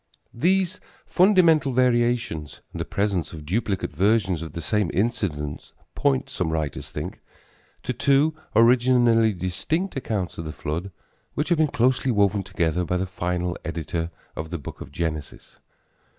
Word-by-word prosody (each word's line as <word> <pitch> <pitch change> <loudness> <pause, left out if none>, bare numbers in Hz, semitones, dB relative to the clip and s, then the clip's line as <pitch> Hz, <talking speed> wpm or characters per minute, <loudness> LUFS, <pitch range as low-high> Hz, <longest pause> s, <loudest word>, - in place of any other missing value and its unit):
These 185 - +1 0.3
fundamental 170 -8 +4
variations 120 - +1
and - - -6
the - - -2
presence 100 -5 -1
of 75 -2 -8
duplicate 100 +3 -1
versions 95 -4 +2
of 80 - -7
the - - -5
same 105 +1 0
incidents 85 -9 -2 0.2
point, 65 -2 +1
some - - -2
writers 80 -3 -3
think, - - -6 0.6
to 125 - -2
two 140 +4 +3 0.2
originally 120 -1 +5
distinct 105 - -2
accounts 105 - -3
of 80 - -4
the 75 - -5
flood 85 +7 -4 0.5
which 150 - -1
have 170 -3 +2
been 155 - +4
closely 130 0 +1
woven 100 -3 +3
together 90 -2 -1
by 90 +1 -1
the 95 - -1
final 90 -1 -2
editor 80 +1 -3 0.3
of 80 +1 -5
the 85 - -3
book 70 - -9
of - - -8
Genesis. 80 -2 -5
100 Hz, 150 wpm, -24 LUFS, 85-125 Hz, 0.6 s, originally